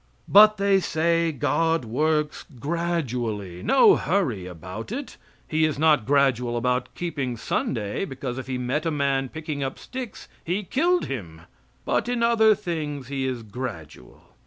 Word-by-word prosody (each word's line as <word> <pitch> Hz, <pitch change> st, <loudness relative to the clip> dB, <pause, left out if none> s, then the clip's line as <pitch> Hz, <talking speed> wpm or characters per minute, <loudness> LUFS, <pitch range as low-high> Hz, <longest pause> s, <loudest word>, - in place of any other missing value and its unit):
But, 215 Hz, +1 st, +7 dB
they 200 Hz, 0 st, +3 dB
say, 165 Hz, -1 st, +1 dB
God 160 Hz, +1 st, +1 dB
works 150 Hz, +6 st, 0 dB, 0.2 s
gradually. 125 Hz, -, -2 dB
No 330 Hz, -, +6 dB
hurry 130 Hz, -, -1 dB
about 90 Hz, -, -8 dB
it. 270 Hz, +3 st, -5 dB, 0.3 s
He 160 Hz, 0 st, +1 dB
is 155 Hz, -2 st, +1 dB
not 150 Hz, -6 st, +3 dB
gradual 130 Hz, -4 st, +2 dB
about 125 Hz, +1 st, 0 dB
keeping 140 Hz, -8 st, -3 dB
Sunday, 105 Hz, -, -2 dB
because, 130 Hz, -5 st, -5 dB
if 130 Hz, -, -7 dB
He 130 Hz, -1 st, -2 dB
met 130 Hz, +6 st, -1 dB
a -, -, +2 dB
man 140 Hz, -3 st, 0 dB
picking 155 Hz, -1 st, -5 dB
up 135 Hz, -1 st, -3 dB
sticks, 255 Hz, -5 st, -7 dB, 0.2 s
He 185 Hz, +5 st, -1 dB
killed 345 Hz, -, +1 dB
Him; 85 Hz, -12 st, -6 dB, 0.4 s
but -, -, 0 dB
in 245 Hz, -1 st, 0 dB
other 220 Hz, -2 st, +5 dB
things 150 Hz, -9 st, -4 dB
He 135 Hz, -1 st, -2 dB
is 125 Hz, -3 st, -3 dB
gradual. 100 Hz, -, -8 dB
145 Hz, 150 wpm, -25 LUFS, 125-170 Hz, 0.4 s, But